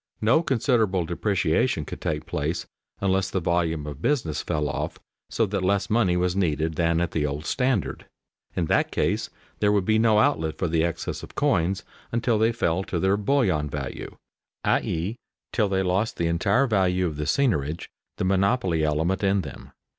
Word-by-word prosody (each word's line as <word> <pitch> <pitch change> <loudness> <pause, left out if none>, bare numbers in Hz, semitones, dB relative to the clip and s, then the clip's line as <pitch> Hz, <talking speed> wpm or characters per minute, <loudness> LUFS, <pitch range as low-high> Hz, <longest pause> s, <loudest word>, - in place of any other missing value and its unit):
No 115 +9 +4
considerable 115 - +1
depreciation 90 +1 0
could - - -8
take 75 0 -2
place 80 0 -2 0.4
unless 95 -1 +1
the 95 - -1
volume 80 -3 0
of 75 -1 -7
business 115 - 0
fell 75 -1 -1
off - - -3 0.3
so 115 - +1
that 100 -1 -2
less 100 +2 +1
money 100 -6 +3
was 90 0 +1
needed 80 -4 0
than 85 +1 +1
at 85 -1 -1
the 80 - 0
old 75 +1 -3
standard. 125 - -1 0.5
In 85 - 0
that - - +1
case - - 0 0.3
there 105 -1 +3
would 100 -3 +2
be 110 +1 +3
no 110 -2 +4
outlet 80 -7 +2
for 90 - 0
the 80 0 +1
excess 85 -1 -3
of - - -11
coins 90 +4 +1 0.3
until 115 -1 +1
they 110 +1 +3
fell 95 -5 0
to 90 - -3
their 95 +3 +2
bullion 100 - +1
value, - - -6 0.5
i.e., 90 +9 0 0.4
till 105 -4 +2
they 95 0 +1
lost 95 +5 0
the 85 - 0
entire 100 +10 +2
value 95 -5 +2
of 80 -4 -3
the 75 -1 -3
seigniorage, 80 - 0 0.3
the - - -1
monopoly 95 -3 +2
element 80 +6 0
in 100 0 +3
them. - - -10
95 Hz, 175 wpm, -25 LUFS, 80-105 Hz, 0.5 s, No